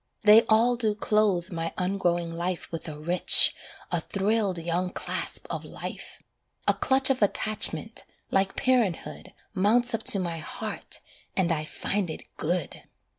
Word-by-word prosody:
They 215 Hz, +1 st, +8 dB
all 235 Hz, +3 st, +4 dB
do 220 Hz, -3 st, +1 dB
clothe 210 Hz, -5 st, 0 dB
my 165 Hz, -1 st, -4 dB
ungrowing 175 Hz, -3 st, -1 dB
life 175 Hz, +1 st, -4 dB
With 165 Hz, 0 st, -6 dB
a 150 Hz, -, -8 dB
rich, 175 Hz, +4 st, +6 dB, 0.4 s
a -, -, +2 dB
thrilled 200 Hz, -1 st, -1 dB
young 170 Hz, +2 st, -2 dB
clasp -, -, -5 dB
of -, -, -4 dB
life; -, -, -8 dB, 0.4 s
A -, -, +6 dB
clutch 265 Hz, 0 st, +3 dB
of 260 Hz, -, -1 dB
attachment, 215 Hz, +1 st, -1 dB, 0.3 s
like 195 Hz, 0 st, +1 dB
parenthood, 245 Hz, -9 st, -1 dB, 0.2 s
Mounts 225 Hz, +5 st, +3 dB
up 225 Hz, -, -1 dB
to -, -, +5 dB
my 170 Hz, -3 st, -3 dB
heart, 155 Hz, -, -5 dB, 0.4 s
and 175 Hz, -3 st, +1 dB
I 155 Hz, -1 st, -1 dB
find 195 Hz, +3 st, -3 dB
it 155 Hz, -, -6 dB
good. 170 Hz, 0 st, -2 dB
190 Hz, 145 wpm, -26 LUFS, 170-215 Hz, 0.4 s, They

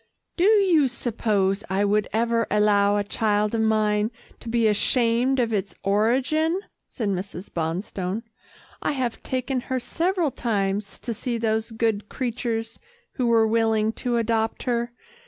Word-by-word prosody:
"Do 350 Hz, -, 0 dB
you 385 Hz, -9 st, +5 dB
suppose 215 Hz, -5 st, 0 dB
I 195 Hz, +2 st, +1 dB
would 210 Hz, +1 st, +1 dB
ever 230 Hz, 0 st, +1 dB
allow 205 Hz, -1 st, +3 dB
a 205 Hz, -, +1 dB
child 210 Hz, 0 st, 0 dB
of 225 Hz, -, +1 dB
mine 215 Hz, -1 st, +2 dB, 0.3 s
to 230 Hz, -, -8 dB
be 230 Hz, -1 st, +2 dB
ashamed 240 Hz, +4 st, +2 dB
of 230 Hz, -2 st, +1 dB
its 195 Hz, -1 st, -2 dB
origin?" 260 Hz, -, +2 dB, 0.3 s
said 220 Hz, -4 st, -3 dB
Mrs. 190 Hz, 0 st, -5 dB
Bonstone. 180 Hz, +5 st, -3 dB, 0.6 s
"I -, -, 0 dB
have 255 Hz, -4 st, -2 dB
taken 260 Hz, 0 st, -2 dB
her 260 Hz, 0 st, 0 dB
several 335 Hz, +5 st, 0 dB
times 200 Hz, -4 st, -2 dB
to 235 Hz, -, -3 dB
see 235 Hz, +2 st, -3 dB
those 220 Hz, 0 st, 0 dB
good 225 Hz, -2 st, -1 dB
creatures 230 Hz, -2 st, -3 dB, 0.3 s
who 250 Hz, -3 st, -1 dB
were 230 Hz, -1 st, +4 dB
willing 220 Hz, -1 st, +2 dB
to 245 Hz, -2 st, 0 dB
adopt 225 Hz, -1 st, 0 dB
her. 240 Hz, -1 st, -1 dB
225 Hz, 145 wpm, -24 LUFS, 210-245 Hz, 0.6 s, you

